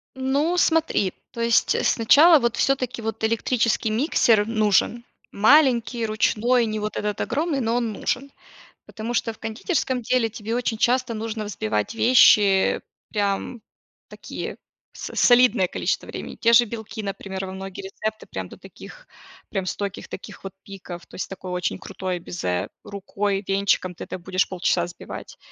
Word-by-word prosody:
Ну, 280 +7 0
смотри. 320 - +2 0.2
То 235 - -6
есть 230 0 +2
сначала 300 +8 +6
вот 235 -3 0
всё-таки 260 -2 0
вот 220 0 -5
электрический 230 0 +1
миксер 225 -4 +3
нужен: 220 +1 +1 0.3
маленький, 240 0 +4
ручной, 230 +3 +2
не 215 0 -3
вот 210 0 -4
этот 210 0 -2
огромный, 300 -1 -1
но 230 -1 0
он 235 -2 0
нужен. 270 +7 -3 0.6
Потому 225 +2 -6
что 225 -1 0
в - - -19
кондитерском 250 - -2
деле 245 0 +1
тебе 220 +1 -5
очень 240 -2 -1
часто 245 0 +1
нужно 220 0 -4
взбивать 110 - -2
вещи, 210 -5 +5 0.3
прям 205 +3 -1 0.5
такие, - - -7 0.4
с - - -8
солидное 245 -5 +5
количество - - -2
времени. - - -7
Те 230 - +2
же 240 +1 +7
белки, 220 -1 -7
например, 195 -1 -5
во 185 - -7
многие 190 0 -7
рецепты, 215 +3 -5
прям - - -5
до - - -12
таких, - - -13 0.4
прям 195 -2 -2
стойких 200 +1 -4
таких - - -9
вот 195 - -6
пиков, 185 -3 -9
то - - -18
есть - - -4
такое 185 -1 -7
очень 180 +1 -2
крутое 185 -1 -4
безе, 90 - -3 0.2
рукой, 200 0 -3
венчиком 195 -2 +1
ты - - -8
это - - -6
будешь 185 +2 -1
полчаса 180 -1 0
взбивать. 175 +1 -9
220 Hz, 155 wpm, -23 LUFS, 195-245 Hz, 0.6 s, же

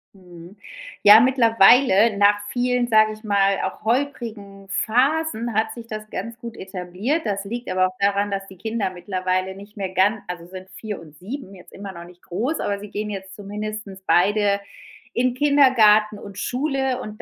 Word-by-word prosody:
Mhm, 180 +1 -14 0.5
ja, 205 +2 +10
mittlerweile 230 -3 +5
nach 205 0 +4
vielen, 245 0 0
sage 215 -2 +4
ich 215 - -14
mal, 200 -2 +2
auch - - -5
holprigen 220 -6 -3
Phasen 245 +2 0
hat 220 +1 0
sich 235 -1 -10
das 215 -1 -7
ganz 230 +4 -6
gut 235 -1 -9
etabliert. 190 - -3
Das 200 -2 -2
liegt 240 +4 -6
aber 185 0 +2
auch 185 - -11
daran, 200 +1 +1
dass 195 0 -3
die 190 - -14
Kinder 220 0 -2
mittlerweile 185 +1 -2
nicht 205 +2 -14
mehr 195 -2 -3
ganz 200 +3 +2
also 175 -1 -7
sind 185 +1 -10
4 205 +3 -6
und 155 -2 -15
7, 210 +1 -7
jetzt 180 -2 -15
immer 195 0 -8
noch 170 -1 -10
nicht 180 0 -17
groß, 235 - -2
aber 200 0 -2
sie 210 +1 -9
gehen 210 +1 -4
jetzt 190 -1 -7
zumindest 210 -1 -7
beide 200 +2 +3 0.5
in 250 0 +1
Kindergarten 240 -7 +4
und 200 -1 -10
Schule 265 0 -1
und 215 0 -9
210 Hz, 175 wpm, -22 LUFS, 195-230 Hz, 0.5 s, ja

